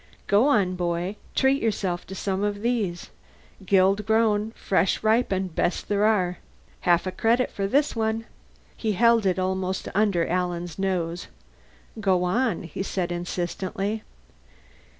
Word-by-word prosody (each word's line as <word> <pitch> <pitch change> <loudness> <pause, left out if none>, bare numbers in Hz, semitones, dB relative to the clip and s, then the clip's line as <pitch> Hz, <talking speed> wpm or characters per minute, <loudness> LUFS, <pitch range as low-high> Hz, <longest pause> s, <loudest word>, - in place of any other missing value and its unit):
"Go 210 +7 +4
on, 200 -9 +3
boy. 175 +2 -2 0.2
Treat 270 +1 +3
yourself 195 -5 -1
to 190 - -7
some 195 0 -2
of 205 0 -2
these. 215 -8 -1 0.6
Guild 195 +2 +3
grown, 220 -1 +2
fresh 190 +1 +1
ripened, 200 -5 +1
best 175 - -1
there 205 0 +2
are. 185 -5 +1 0.4
Half 175 0 +2
a 185 - -2
credit 230 +6 +1
for 195 -1 -2
this 280 +6 +1
one." 225 0 -1 0.5
He 220 -2 -1
held 230 0 +4
it 185 - +1
almost 190 0 -2
under 195 -5 +2
Alan's 175 -1 -2
nose. 175 -3 -2 0.7
"Go 190 -4 +2
on," 205 +2 0
he 165 +2 -6
said 185 -2 -2
insistently. 185 +4 -3
195 Hz, 135 wpm, -25 LUFS, 180-220 Hz, 0.7 s, Go